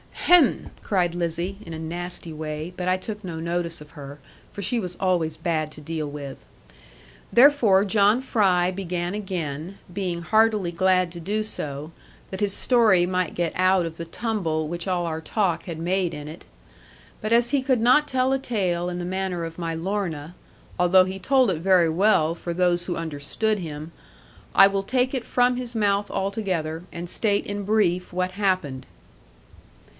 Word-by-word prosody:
'Hem!' 350 -7 +3
cried 180 -4 0
Lizzie, 175 +2 -2
in 165 - -8
a 160 - -6
nasty 175 0 -4
way; 155 +2 -5
but 180 0 -4
I 185 - +3
took 210 +2 -6
no 170 -3 -5
notice 170 -1 -2
of 150 - -13
her, 145 -2 -9 0.3
for 200 - -7
she 235 +6 0
was 180 -4 -5
always 175 -4 +1
bad 155 -3 -1
to 150 - -10
deal 155 -1 -4
with. 140 -2 -8 0.9
Therefore 240 -7 +6
John 210 +3 +3
Fry 185 -8 +2
began 180 -1 -3
again, 180 -3 -4 0.2
being 180 -3 -2
heartily 215 0 +2
glad 185 0 +2
to 170 - -8
do 205 +6 -1
so, 150 -6 -6 0.4
that 190 - -5
his 205 -2 +1
story 215 -9 +4
might 180 0 -1
get 170 -2 0
out 185 -1 +3
of 165 -1 -6
the 170 - -5
tumble 165 -5 -2
which 170 +2 -5
all 180 -2 0
our 160 -1 -3
talk 175 -2 0
had 170 -3 -5
made 175 +1 0
in 150 0 -7
it. 155 +3 -10 0.7
But 215 +1 -1
as 235 +1 +4
he 280 - +2
could 260 -3 +1
not 255 +6 +5
tell 260 0 +1
a 270 - +1
tale 180 -8 -1
in 175 0 -4
the 175 - -4
manner 185 -1 -2
of 165 +1 -7
my 165 -1 -2
Lorna 170 -3 -3 0.5
(although 180 +1 +6
he 190 +1 -5
told 260 -2 +3
it 165 - -2
very 180 -1 +4
well 165 -2 +3
for 170 0 -5
those 175 0 +1
who 175 - -2
understood 165 +7 -2
him) 155 -2 -7 0.6
I 195 - +9
will 195 0 +1
take 255 +4 0
it 255 -3 -2
from 245 0 +2
his 245 -1 -5
mouth 205 -1 +1
altogether, 185 -5 -2
and 175 0 -6
state 205 0 0
in 205 0 -4
brief 185 -4 +1
what 180 +1 -1
happened. 185 -9 -1
180 Hz, 180 wpm, -24 LUFS, 165-205 Hz, 0.9 s, I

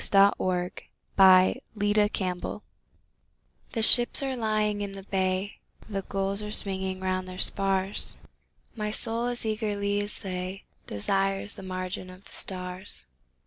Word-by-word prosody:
Zoë 200 0 +6
Akins 180 -1 -2 0.3
The 185 -1 +7 0.6
Wanderer 180 -2 -3 1.1
THE 225 - 0
ships 240 +4 +6
are 265 -1 -1
lying 215 -3 0
in 200 -1 -4
the 195 0 -8
bay, 190 0 -1 0.3
The 200 -3 -2
gulls 195 +1 -2
are 210 - -5
swinging 190 -2 -2
round 185 0 -1
their 185 0 -7
spars; 195 +1 0 0.6
My 210 -2 -2
soul 230 +2 -1
as 240 -1 -1
eagerly 205 -2 0
as 205 0 -6
they 185 0 -4 0.2
Desires 195 - 0
the - - -10
margin 185 0 -4
of 185 +1 -13
the - - -13
stars. 180 - -3
195 Hz, 135 wpm, -28 LUFS, 185-210 Hz, 1.1 s, The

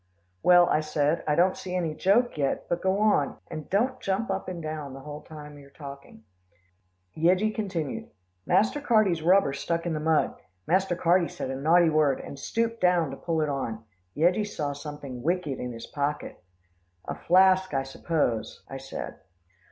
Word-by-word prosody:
"Well," 175 -1 +6
I 150 - +2
said. 155 +1 0
"I 150 - +2
don't 180 +3 +3
see 185 -1 -6
any 170 -4 -1
joke 200 +10 +2
yet, 140 -3 -1
but 175 - -1
go 190 +1 +1
on, 210 -9 +2
and 155 - -7
don't 250 +6 +1
jump 195 +1 -1
up 190 0 -3
and 180 -2 -5
down 155 -4 -5
the 135 - -9
whole 150 +1 -8
time 150 -2 -11
you're 140 -1 -15
talking." 140 -5 -11 0.9
Yeggie 185 +7 +2
continued, 185 - -3 0.3
"Master 220 - +2
Carty's 215 - +3
rubber 180 -3 +4
stuck 170 +4 -2
in 170 - -1
the 155 - -2
mud, 160 0 +2 0.3
Master 185 0 +2
Carty 175 0 +3
said 130 - -5
a - - -3
naughty 160 +4 +4
word, 150 -3 +2
and 140 - -9
stooped 230 +7 -2
down 175 -5 +3
to - - -5
pull 160 +2 -1
it 155 - 0
on. 115 -5 -3 0.3
Yeggie 180 +7 +2
saw 145 -8 -3
something 145 -3 -8
wicked 165 -2 -1
in 125 - -4
his 115 -1 -8
pocket." 145 - -4 0.6
"A - - -2
flask, 185 +1 +4
I 135 - +1
suppose," 135 -4 -2
I 135 - -7
said. 135 0 -7
160 Hz, 175 wpm, -27 LUFS, 145-185 Hz, 0.9 s, Well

